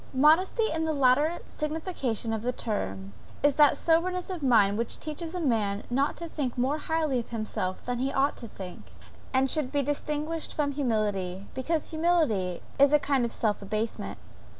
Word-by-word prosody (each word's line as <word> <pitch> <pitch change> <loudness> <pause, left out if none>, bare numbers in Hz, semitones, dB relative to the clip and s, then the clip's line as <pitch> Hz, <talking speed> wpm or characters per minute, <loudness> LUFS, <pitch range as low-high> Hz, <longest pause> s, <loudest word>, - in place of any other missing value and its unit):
Modesty 320 - +4
in 320 0 -1
the 315 -1 0
latter 285 +5 +3
signification 300 - -2
of 220 - -2
the 245 +2 0
term, 100 - -4 0.3
is 290 0 +5
that 295 +1 +5
soberness 360 +3 +1
of 355 -4 -4
mind 220 -7 +4
which 235 - -2
teaches 320 +3 -5
a - - -2
man 215 -9 0
not 275 +4 +1
to 340 - -5
think 275 -7 -3
more 270 +5 +1
highly 310 -5 0
of 235 - -7
himself 215 -5 -3
than 245 -1 -2
he 265 +2 0
ought 275 +2 +2
to 235 - -8
think, 190 -4 -10 0.4
and 260 +1 +3
should 270 -1 +1
be 285 -1 +1
distinguished 300 +3 -2
from 290 -2 0
humility, 205 -8 -1
because 310 +6 -2
humility 315 - +1 0.2
is 280 +1 +6
a - - +8
kind 275 -3 +1
of 235 - -3
self 215 -3 0
abasement. 215 +3 -3
270 Hz, 175 wpm, -28 LUFS, 225-310 Hz, 0.4 s, a